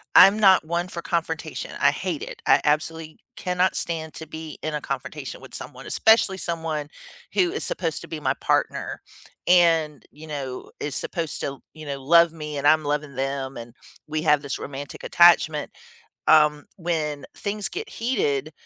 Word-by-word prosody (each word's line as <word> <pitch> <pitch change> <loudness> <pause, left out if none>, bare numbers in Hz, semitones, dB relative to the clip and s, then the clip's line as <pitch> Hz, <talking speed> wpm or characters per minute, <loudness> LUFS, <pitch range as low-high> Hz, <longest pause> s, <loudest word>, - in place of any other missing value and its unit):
I'm 200 +2 +8
not 190 -5 +6
one 170 +2 -1
for 170 - -6
confrontation. 165 -1 -3
I - - +5
hate - - -3
it. - - -8
I - - +6
absolutely 155 +1 -1 0.2
cannot 180 0 0
stand 160 -2 -2
to 160 - -7
be 160 -1 -8
in 155 - -2
a 150 - -2
confrontation 135 -2 -5
with - - -13
someone, - - -5
especially 220 -4 +4
someone 160 -4 -3 0.5
who 185 -4 +2
is - - -2
supposed 165 -4 -1
to - - -10
be 160 -1 -5
my 135 -3 +1
partner - - 0 0.5
and, 165 -5 +4
you 150 +2 -13
know, 135 -4 -6
is 145 -3 -3
supposed 165 -4 -2
to, 140 -1 -4
you 155 -1 -10
know, 140 -1 -5
love 170 +3 +5
me 150 -2 -6
and 140 +1 +1
I'm 155 +1 +5
loving 145 -1 -2
them, 135 0 -3
and 115 0 -9 0.3
we 155 0 -2
have 150 -3 +4
this 140 -2 -4
romantic 140 0 -7
attachment. 170 -3 +4 0.6
Um, 150 -1 +5
when 155 -5 -2
things 205 0 -2
get 410 +5 -6
heated, 155 - -1
155 Hz, 170 wpm, -24 LUFS, 145-170 Hz, 0.6 s, I'm